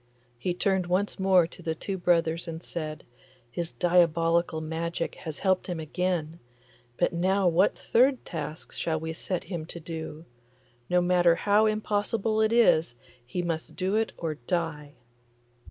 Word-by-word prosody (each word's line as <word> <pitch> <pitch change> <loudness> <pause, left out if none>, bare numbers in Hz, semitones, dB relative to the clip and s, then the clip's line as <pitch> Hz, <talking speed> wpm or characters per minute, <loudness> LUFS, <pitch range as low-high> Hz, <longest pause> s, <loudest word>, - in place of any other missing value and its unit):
He 175 +8 -1
turned 190 -1 +1
once 190 +3 0
more 190 -2 +5
to 170 - -12
the 160 -2 -2
two 195 +4 -4
brothers 170 -2 +1
and 165 0 -6
said, 155 -2 -5 0.5
'His 170 +3 -4
diabolical 170 -2 +2
magic 165 +1 -3
has 155 -3 -7
helped 190 -1 +1
him 175 -3 -3
again, 165 0 -2 0.6
but - - +1
now 190 +3 +2
what 175 +3 +3
third 255 +2 +2
task 155 -1 -6
shall 160 -1 -2
we 160 +1 -4
set 175 +2 -3
him 170 -5 -5
to 170 - -7
do? 160 -1 -7 0.6
No 180 0 +4
matter 175 -1 +4
how 210 +4 +3
impossible 215 +1 0
it 220 0 +3
is, 170 - +4 0.3
he 150 +9 -3
must 165 -2 -3
do 190 +2 0
it 220 0 +1
or 165 -2 -2
die. 160 -4 -2
175 Hz, 155 wpm, -27 LUFS, 160-190 Hz, 0.6 s, more